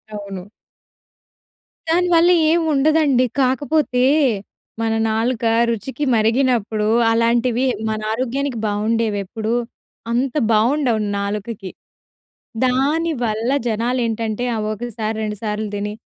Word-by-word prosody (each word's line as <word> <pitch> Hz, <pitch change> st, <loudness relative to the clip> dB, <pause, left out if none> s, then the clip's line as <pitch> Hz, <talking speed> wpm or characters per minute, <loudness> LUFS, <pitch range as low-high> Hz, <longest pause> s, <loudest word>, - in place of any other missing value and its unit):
అవును. 195 Hz, -2 st, -7 dB, 1.4 s
దానివల్ల 345 Hz, 0 st, +4 dB, 0.2 s
ఏం 340 Hz, 0 st, +3 dB
ఉండదండి. 280 Hz, -3 st, +3 dB, 0.2 s
కాకపోతే 265 Hz, 0 st, +1 dB, 0.8 s
మన 225 Hz, 0 st, 0 dB, 0.2 s
నాలుక 230 Hz, +2 st, -1 dB, 0.3 s
రుచికి 260 Hz, +6 st, -3 dB
మరిగినప్పుడు 225 Hz, -2 st, +1 dB, 0.2 s
అలాంటివి 235 Hz, +2 st, +2 dB, 0.2 s
మన 215 Hz, 0 st, -2 dB
ఆరోగ్యానికి 255 Hz, +2 st, -2 dB
బావుండేవెప్పుడు 215 Hz, 0 st, -1 dB, 0.6 s
అంత 250 Hz, +3 st, 0 dB, 0.2 s
బావుండవు 235 Hz, +1 st, +2 dB, 0.2 s
నాలుకకి. 200 Hz, 0 st, -4 dB, 1.0 s
దానివల్ల 255 Hz, -4 st, 0 dB, 0.2 s
జనాలేంటంటే 230 Hz, 0 st, -1 dB
ఆ -, -, -2 dB, 0.2 s
ఒకసారి 220 Hz, -1 st, -4 dB
రెండు 210 Hz, -1 st, -3 dB
సార్లు 210 Hz, 0 st, -2 dB
దిని 205 Hz, +1 st, -3 dB
230 Hz, 85 wpm, -20 LUFS, 215-260 Hz, 1.4 s, దానివల్ల